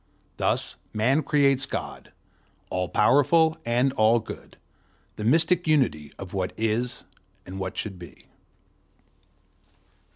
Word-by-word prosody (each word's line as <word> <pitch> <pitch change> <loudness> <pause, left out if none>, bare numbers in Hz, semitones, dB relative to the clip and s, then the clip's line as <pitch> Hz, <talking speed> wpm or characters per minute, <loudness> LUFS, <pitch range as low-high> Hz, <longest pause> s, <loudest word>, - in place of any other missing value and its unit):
Thus - - -1 0.2
Man 125 +8 +2
creates 140 -2 +2
God, - - -6 0.6
all 90 -1 -1
powerful 160 +7 +4
and 125 +3 +2
all 110 0 +4
good, 110 - -10 0.6
the 105 - -6
mystic 165 +8 +2
unity 95 - +1
of 95 -2 -9
what 95 -2 -2
is 115 +2 -1 0.4
and 95 +1 -7
what 95 -1 -5
should 95 -4 -4
be. 85 -2 -13
120 Hz, 110 wpm, -25 LUFS, 95-140 Hz, 0.6 s, powerful